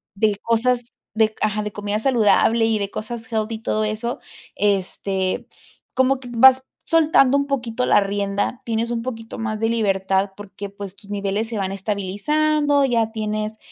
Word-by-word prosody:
de 205 0 +1
cosas 240 +1 0 0.2
de 220 -1 +2
ajá, 215 0 +1
de 210 - -4
comida 205 +1 -2
saludable 230 -2 +3
y 225 -1 +1
de 200 -1 -2
cosas 230 +3 -6
healthy 220 0 -1
y 220 - -9
todo 215 0 0
eso, 215 +3 -3 0.4
este, 195 -1 -1 0.5
como 260 +1 +2
que 245 - -9
vas 260 +2 +6 0.2
soltando 315 -5 +4
un 280 - 0
poquito 250 -3 -1
la - - +5
rienda. 200 +3 -1
Tienes 230 0 -1
un 230 -1 -1
poquito 225 -3 -6
más 215 -2 -3
de 225 - +1
libertad 195 -3 +1
porque, 200 0 -8
pues, 200 -1 -9
tus 200 0 -18
niveles 205 +2 -1
se 225 - -4
van 195 -1 -2
estabilizando, 285 +10 +1
ya 230 -3 +1
tienes, 215 0 -3
220 Hz, 165 wpm, -21 LUFS, 205-240 Hz, 0.5 s, vas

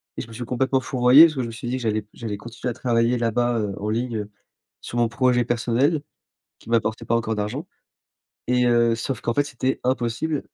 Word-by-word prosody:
et - - -4
je - - -12
me 115 - -12
suis 120 +2 -6
complètement 130 +2 0
fourvoyé 125 +4 +7
parce 160 -2 0
que 130 - -1
je 120 - -3
me - - -6
suis 115 +1 -7
dit 125 - -1
que - - -6
j'allais 110 -1 0
j'allais 105 -3 -5
continuer 120 +3 -6
à - - -5
travailler 120 0 +1
là-bas, 120 +1 +1
heu, 105 -2 -2
en 105 - -3
ligne, 115 +1 -1
heu, 105 -1 -5 0.5
sur 120 - -5
mon 120 -1 +3
projet 125 +1 +2
personnel 120 +6 +1 0.6
qui - - -17
m'apportait 110 -1 0
pas 115 - +1
encore 110 -1 -1
d'argent 105 0 -3 0.8
et, 125 0 +2
heu, 120 -1 +3
sauf 115 +1 -4
qu'en 120 - -1
fait, 145 - +2
c'était 130 -1 -2
impossible. 130 +4 -1
120 Hz, 220 wpm, -23 LUFS, 115-125 Hz, 0.8 s, fourvoyé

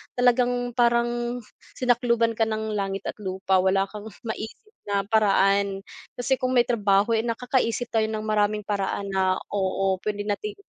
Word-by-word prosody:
talagang 245 0 +2
parang 240 0 +1 0.3
sinakluban 235 -2 +2
ka 225 0 +1
ng 220 0 -2
langit 195 -1 -2
at - - -6
lupa 190 -1 0
wala 190 +1 +3
kang 210 0 -8 0.2
maisip 225 - -7 0.2
na 200 -1 +1
paraan. 200 -2 +2 0.3
Kasi 255 +2 0
kung 255 -1 0
may 240 - +6
trabaho, 210 -2 +2
eh, 220 - +2
nakakaisip 240 0 -1
tayo 220 -1 +2
ng 215 0 -4
maraming 210 0 +1
paraan 200 -1 -2
na 190 -1 +2 0.2
oo, 190 -1 0
puwede 205 0 -2
nating 210 - -3
220 Hz, 150 wpm, -25 LUFS, 200-240 Hz, 0.3 s, may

